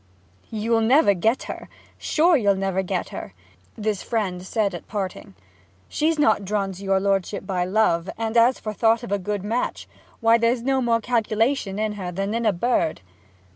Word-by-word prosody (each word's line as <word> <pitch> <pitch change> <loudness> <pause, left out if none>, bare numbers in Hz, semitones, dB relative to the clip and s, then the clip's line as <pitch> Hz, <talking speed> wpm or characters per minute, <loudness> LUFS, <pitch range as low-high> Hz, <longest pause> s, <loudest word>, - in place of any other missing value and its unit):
'You'll 225 +1 0
never 240 -1 +5
get 220 +7 +1
her - - -8 0.3
sure; 335 +2 +3
you'll 205 -7 +3
never 190 0 -1
get 185 -1 -3
her!' 95 - -8 0.4
this 210 -2 -2
friend 195 -6 -2
had 185 - -10
said 210 -3 0
at 175 - -8
parting. 190 - -5 0.5
'She's 315 +1 0
not 220 -8 +3
drawn 195 0 -1
to 190 +1 -10
your 195 0 +2
lordship 195 0 -1
by 185 -2 -1
love: 185 -3 +1
and 225 0 -3
as 235 +2 +5
for 215 - -5
thought 225 +2 +2
of 235 - -7
a 200 - +1
good 205 +1 -3
match, 230 +4 -2 0.3
why, 230 0 +4
there's 230 +1 +1
no 265 0 +1
more 230 -2 +1
calculation 225 -1 0
in 215 0 -1
her 180 -1 -4
than 195 +3 -2
in 230 0 0
a - - +5
bird.' 175 - 0
215 Hz, 185 wpm, -23 LUFS, 195-230 Hz, 0.5 s, never